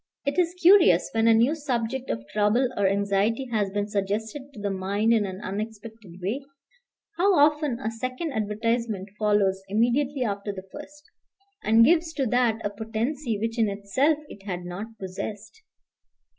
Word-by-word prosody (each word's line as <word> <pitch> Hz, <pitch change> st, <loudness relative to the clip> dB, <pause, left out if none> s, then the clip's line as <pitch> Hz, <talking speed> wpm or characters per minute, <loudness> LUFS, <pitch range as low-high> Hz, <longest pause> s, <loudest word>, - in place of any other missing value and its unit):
It 280 Hz, +5 st, 0 dB
is 350 Hz, 0 st, +1 dB
curious 340 Hz, -, +6 dB
when 225 Hz, 0 st, +2 dB
a 230 Hz, -, +7 dB
new 235 Hz, +6 st, +4 dB
subject 260 Hz, -4 st, -3 dB
of 115 Hz, 0 st, -3 dB
trouble 215 Hz, +5 st, +2 dB
or 200 Hz, -1 st, +2 dB
anxiety 200 Hz, +5 st, +1 dB
has 210 Hz, -3 st, +1 dB
been 205 Hz, +1 st, -2 dB
suggested 215 Hz, +7 st, -3 dB
to 230 Hz, -, -12 dB
the 200 Hz, -1 st, -2 dB
mind 200 Hz, +4 st, +1 dB
in 215 Hz, -3 st, +2 dB
an 190 Hz, 0 st, -6 dB
unexpected 210 Hz, -1 st, -7 dB
way, 220 Hz, +9 st, -1 dB, 0.8 s
how 385 Hz, +2 st, +4 dB
often 295 Hz, -3 st, +3 dB
a 225 Hz, -4 st, -3 dB
second 255 Hz, +7 st, -4 dB
advertisement 220 Hz, -2 st, -2 dB
follows 205 Hz, -3 st, +2 dB
immediately 250 Hz, +6 st, +1 dB
after 205 Hz, -2 st, -3 dB
the 190 Hz, -1 st, -9 dB
first, 295 Hz, 0 st, -11 dB, 0.6 s
and 225 Hz, +1 st, +6 dB
gives 325 Hz, +2 st, +3 dB
to 275 Hz, -, -1 dB
that 235 Hz, -2 st, +1 dB
a 205 Hz, -, -1 dB
potency 225 Hz, +4 st, -3 dB
which 225 Hz, +3 st, -3 dB
in 220 Hz, -2 st, +3 dB
itself 205 Hz, +10 st, +1 dB
it 205 Hz, -, -12 dB
had 180 Hz, -3 st, -5 dB
not 180 Hz, +5 st, -5 dB
possessed. 205 Hz, -, -7 dB
225 Hz, 160 wpm, -25 LUFS, 200-265 Hz, 0.8 s, a